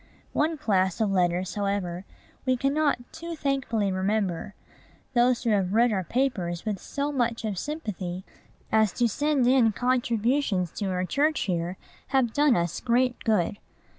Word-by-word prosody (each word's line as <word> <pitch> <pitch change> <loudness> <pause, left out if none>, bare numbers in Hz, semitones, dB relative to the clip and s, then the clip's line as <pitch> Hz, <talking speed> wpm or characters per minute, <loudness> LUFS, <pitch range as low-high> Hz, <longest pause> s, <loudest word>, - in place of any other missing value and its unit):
One 315 +2 +1
class 190 - +1
of 215 -3 +1
letters, 180 0 +1
however, 195 -3 -2 0.4
we 255 -1 +1
cannot 285 +3 +2 0.2
too 335 +1 -6
thankfully 265 -9 0
remember. 190 0 -1 0.6
Those 245 0 +3
who 235 - +1
have 195 -1 +1
read 235 +1 +4
our 190 -2 0
papers 185 - -1
with 210 -3 -2
so 285 +1 -3
much 235 -4 -1
of 205 -4 -2
sympathy 190 - -5 0.5
as 220 -2 +4
to 240 - +2
send 290 +3 +1
in 250 -3 +5
contributions 240 - +1
to 205 - -1
our 185 -1 -1
church 300 +9 +1
here 175 0 -2 0.3
have 260 -4 +1
done 290 -3 +4
us 170 0 -1
great 250 +1 +1
good. 205 -3 +1
225 Hz, 150 wpm, -26 LUFS, 190-260 Hz, 0.6 s, in